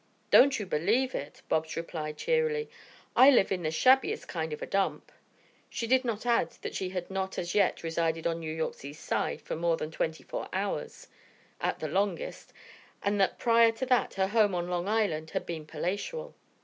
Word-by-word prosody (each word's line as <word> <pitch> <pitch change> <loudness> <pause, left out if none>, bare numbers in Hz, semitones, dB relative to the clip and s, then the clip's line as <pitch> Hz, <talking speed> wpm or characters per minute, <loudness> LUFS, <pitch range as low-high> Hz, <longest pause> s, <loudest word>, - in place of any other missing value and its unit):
"Don't 275 +1 +7
you 210 - -3
believe 210 +11 +1
it!" 145 +1 -6
Bobs 160 0 -1
replied 155 -2 -4
cheerily. 470 -2 0 0.4
"I 260 +2 +9
live 240 -9 +4
in 185 -2 0
the 155 - -1
shabbiest 255 +12 +3
kind 160 -2 -3
of 150 - -4
a - - -2
dump." 195 0 -1 0.6
She 230 - -3
did 260 +3 +3
not 230 -2 -3
add 235 -1 +2
that - - -4
she 185 - -2
had 185 0 -5
not 190 0 -3
as 175 0 -3
yet 200 -4 +2
resided 165 0 -1
on 165 0 0
New 160 -1 -5
York's 160 -3 -4
East 145 +2 -9
Side - - -1
for - - -4
more 165 0 +1
than 155 - -5
twenty 160 0 -2
four - - -5
hours, - - -3 0.5
at - - -1
the 155 - -4
longest, 200 - -2 0.5
and 200 0 +1
that 190 - +2
prior 230 -1 +5
to 245 +4 -3
that 250 -1 +1
her 190 0 +1
home 210 -3 +3
on 175 0 -2
Long 180 +1 -2
Island 200 -8 0
had - - -3
been 160 -3 -6
palatial. 205 - -4
190 Hz, 195 wpm, -29 LUFS, 160-230 Hz, 0.6 s, I